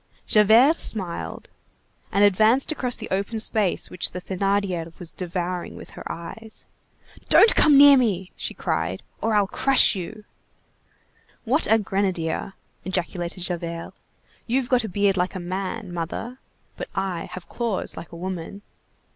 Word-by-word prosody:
Javert 225 +9 +5
smiled, 185 -6 -5 0.6
and 200 - +3
advanced 220 - +4
across 250 -5 -2
the - - -7
open 200 +4 -1
space 215 -3 0
which 180 - -2
the 180 - -4
Thénardier 185 -3 -2
was 170 -2 -7
devouring 180 0 -4
with - - -11
her - - -7
eyes. 220 +7 -9 0.6
"Don't 450 - +7
come 295 -2 +6
near 285 0 +9
me," 195 -7 0
she - - -5
cried, - - -2 0.2
"or 225 -1 +1
I'll 205 -1 +4
crush 270 +7 +4
you." 210 +3 -7 1.2
"What 260 0 +1
a 225 - +7
grenadier!" 190 -4 -2 0.3
ejaculated 180 -1 -3
Javert; 170 -1 -4 0.5
"you've 250 +1 0
got 250 -2 +3
a 220 - -4
beard 200 +1 +1
like 180 +2 -1
a - - -3
man, 185 +2 -4
mother, 185 +9 -5 0.4
but - - -6
I 190 -3 -2
have 185 - -8
claws 230 -5 -2
like 170 - -9
a 170 - -9
woman." 185 +2 -6
195 Hz, 145 wpm, -24 LUFS, 180-225 Hz, 1.2 s, near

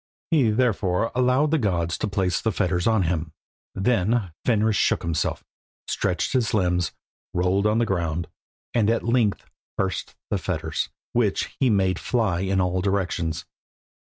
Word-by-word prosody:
He 140 -8 +4
therefore 105 -3 +1
allowed 125 +4 +2
the 160 - +3
gods 85 -7 0
to - - -1
place 95 -3 0
the 110 - +1
fetters 90 -1 0
on 110 -4 +3
him. 80 -2 -2 0.4
Then 105 -1 +1
Fenris 110 -2 +3
shook - - +2
himself, 85 -3 -1 0.4
stretched 90 +5 -1
his 120 -5 +1
limbs, 90 -4 +1 0.4
rolled 95 +3 +2
on 105 +1 +2
the 120 - +3
ground, 85 -4 -1 0.5
and 110 -3 +3
at 115 - +1
length 115 -4 +1 0.3
burst 95 -2 -2 0.2
the - - +1
fetters, - - -2 0.2
which 110 -5 0
he 130 - +3
made 95 -3 +2
fly 110 -8 0
in 95 +1 0
all 90 0 +1
directions. 90 -4 -1
100 Hz, 150 wpm, -24 LUFS, 90-115 Hz, 0.5 s, He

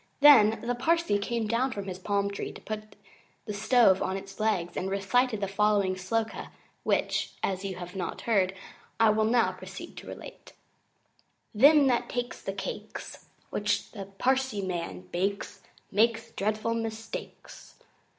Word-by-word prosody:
Then 235 -7 +7
the 245 - +1
Parsee 320 -3 +1
came 230 +2 -1
down 235 +5 +1
from 200 -4 -5
his 185 -1 -6
palm 200 +1 0
tree 200 - -4
and - - -11
put 215 0 -6 0.5
the 210 - -4
stove 215 -2 +4
on 190 - -1
its 195 +1 -10
legs 190 -6 0
and 190 - -2
recited 215 +4 +1
the 200 - 0
following 200 -1 +2
Sloka, 220 +5 -2 0.3
which, - - 0
as 190 0 -1
you 195 -1 -3
have 180 +1 -8
not 185 -2 -4
heard, 195 -4 +2 0.4
I 225 -1 +6
will 215 0 +2
now 235 +1 +3
proceed - - -9
to - - -9
relate: - - -10 1.0
Them 285 +6 +7
that 245 -3 +1
takes 245 0 -3 0.2
cakes - - -7 0.2
Which 205 0 -1
the 200 -3 -7
Parsee 260 -4 +1
man 170 - -4
bakes 195 +2 -2 0.3
Makes 230 +2 +2
dreadful 215 +3 -1
mistakes. 225 -1 -6
215 Hz, 150 wpm, -28 LUFS, 195-230 Hz, 1.0 s, Then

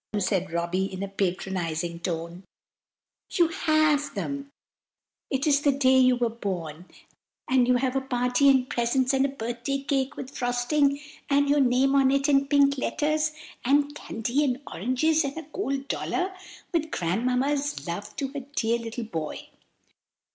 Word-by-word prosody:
said 190 -3 0
Robby, 170 +3 -1
in 190 +1 -5
a - - -2
patronizing 175 -3 -2
tone, 170 0 -4 0.9
"you 340 -3 +3
have 310 -3 +2
them! 280 0 -4 0.8
It 270 +2 -1
is 290 -2 +3
the 290 - +4
day 260 -1 +4
you 255 -1 +5
were 240 -1 +1
born, 180 -7 -5 0.6
and 255 -2 +3
you 250 - +4
have 255 +1 0
a 270 - +1
party 250 +1 +2
and 260 -2 +4
presents, 255 +3 +1
and 270 +1 +3
a - - -6
birthday 240 +1 -3
cake 275 -1 -1
with 270 +2 -7
frosting, 275 +3 +1 0.3
and 285 0 +3
your 290 +1 +3
name 265 +1 +3
on 275 -1 +4
it 275 +1 +2
in 275 -1 +3
pink 280 -1 +3
letters, 305 +2 0 0.3
and 285 +3 +2
candy 245 +1 -2
and 260 -3 0
oranges, 280 - +1
and 280 +2 -4
a 325 - -5
gold 275 -7 -2
dollar 375 +5 -2 0.4
with 320 -2 0
Grandmamma's 255 - -1
love 205 +5 -5
to 275 -3 -3
her 280 -1 -6
dear 230 +1 +1
little 230 +1 -5
boy. 160 -8 -5
260 Hz, 155 wpm, -26 LUFS, 225-280 Hz, 0.9 s, you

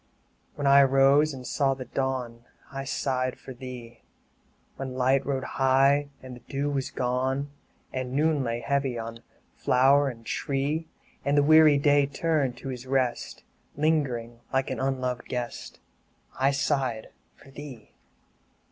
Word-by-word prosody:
3 - - -30
When 145 - -3
I 140 0 +7
rose 135 +3 +4
and 130 -2 -8
saw 135 +1 +1
trhe 130 -2 -10
dawn, 125 -3 -3 0.3
I 135 0 -5
sighed 130 -2 -2
for 130 - -9
thee; 120 -2 -10 0.8
When 130 -1 -5
light 130 +1 +2
rode 135 -2 -1
high, 135 +2 +2
and 130 -1 -8
the - - -12
dew 140 +4 -3
was 135 -2 -2
gone, 130 +3 -1 0.4
And 130 -1 -3
noon 150 0 +2
lay 115 -1 -2
heavy 135 0 -1
on 115 0 -6 0.3
flower 135 +2 +3
and 115 -3 -10
tree, 145 +5 -2 0.4
And 140 +1 +1
the 145 - +5
weary 155 -1 +7
Day 145 0 +3
turned 140 -3 -1
to 135 - -7
his 125 0 -7
rest, 130 -2 -1 0.3
Lingering 130 -7 0
like 135 0 0
an - - -3
unloved 130 -2 -2
guest, 125 -1 -5 0.6
I 135 +1 +2
sighed 135 -5 -1 0.2
for 135 - -18
thee. 135 -6 -10
135 Hz, 145 wpm, -27 LUFS, 125-140 Hz, 0.8 s, I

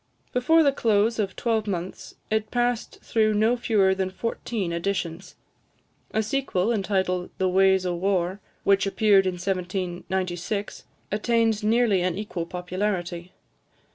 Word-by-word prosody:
Before 320 +6 +4
the 280 - +4
close 225 -2 +2
of 195 -3 -1
twelvemonths, 205 -6 -2 0.2
it 220 0 0
passed 245 -1 -1
through 215 -1 +2
no 220 +3 +3
fewer 210 -5 +2
than 190 0 -1
fourteen 205 -2 -3
editions. 180 0 -3 0.7
A 220 - 0
sequel, 220 -4 0
entitled 190 -3 0
"The 190 - +1
Waes 190 0 +4
o' 180 - 0
War," 185 +1 0 0.2
which 195 0 +3
appeared 195 -1 +4
in 185 - 0
1796, 185 +1 -3 0.3
attained 225 0 +1
nearly 220 -3 +3
an 180 0 -1
equal 195 -5 -4
popularity. 180 -1 -3
195 Hz, 125 wpm, -25 LUFS, 185-220 Hz, 0.7 s, Before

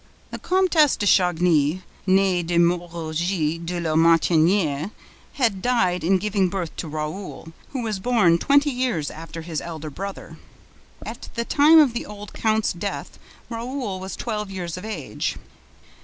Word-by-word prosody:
The - - -6
Comtesse 360 -6 +3
de 205 - -2
Chagny, 175 -3 +3 0.2
nee 190 -1 +3
de 170 0 -1
Moerogis 170 -1 0
de 175 +1 -3
La 165 -2 -1
Martyniere, 165 0 +3 0.4
had 225 -8 0
died 185 -8 +1
in 190 +3 +3
giving 195 -1 0
birth 180 -3 -4
to 165 - -4
Raoul, 155 +2 -6 0.2
who 260 -3 -4
was 215 -4 -2
born 190 -7 +3
twenty 285 - +3
years 245 - -1
after 165 0 -8
his 160 -2 -4
elder 160 -2 -7
brother. 195 +6 -7 0.7
At - - -8
the 235 - -1
time 300 +6 +6
of 290 -6 +6
the 235 - -4
old 205 0 -9
count's 220 -1 +1
death, 190 +4 -5 0.3
Raoul 235 -4 -4
was 190 +1 -6
twelve 210 -3 -4
years 180 -4 -5
of 180 +3 -8
age. 220 - -3
185 Hz, 150 wpm, -23 LUFS, 165-220 Hz, 0.7 s, time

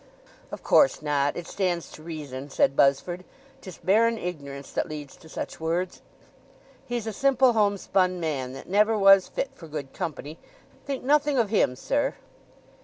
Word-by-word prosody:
"Of - - -8
course 275 - +4
not—it 145 +3 0
stands 180 -3 -2
to - - -12
reason," 145 -4 -7
said 135 - +2
Buzzford. 155 +7 +2 0.4
"'Tis 185 -3 -10
barren 225 +4 +3
ignorance 140 -7 -6
that - - -2
leads 150 -2 -7
to 160 - -16
such - - -6
words. 170 +3 -2 0.9
He's 240 -2 -3
a 220 - -3
simple 265 -1 +3
home 205 -2 +2
spun 185 -1 +1
man, 140 -6 -3
that - - -10
never 210 +3 +3
was 195 -1 +6
fit 275 - -3
for 165 - -12
good 145 -3 -6
company—think 170 - -7
nothing 290 +1 +2
of 225 -4 +1
him, 130 - +2
sir." - - -1
180 Hz, 155 wpm, -26 LUFS, 150-220 Hz, 0.9 s, was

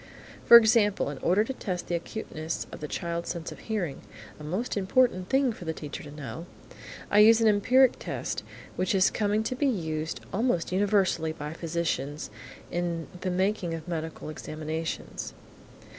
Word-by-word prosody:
For 235 - +12
example, 215 -8 +3
in 140 - -7
order 190 +5 +3
to 265 - -4
test 185 -8 -4
the - - -4
acuteness 170 -2 -4
of - - -8
the 150 - -5
child's 170 +2 -3
sense 170 -1 -4
of - - -10
hearing 195 -10 -3 0.4
(a - - -9
most 185 +11 -2
important 195 -1 +2
thing 265 -3 +3
for 185 - -10
the 160 0 -2
teacher 150 -2 -6
to 145 - -10
know), 145 +2 -7 0.6
I 205 - +5
use 225 +2 +8
an 225 - +4
empiric 245 +5 +4
test - - -3 0.4
which 185 +3 +1
is 190 -1 +4
coming 210 +1 +1
to 255 - -2
be 285 +3 +1
used 160 - -2
almost 200 -5 +1
universally 190 -4 +2
by 150 0 -6
physicians 160 -3 -3 0.4
in 170 -2 -2
the 185 - -2
making 185 -2 0
of 160 +1 -8
medical 160 -2 -4
examinations. 155 +1 -5
180 Hz, 165 wpm, -28 LUFS, 160-215 Hz, 0.6 s, For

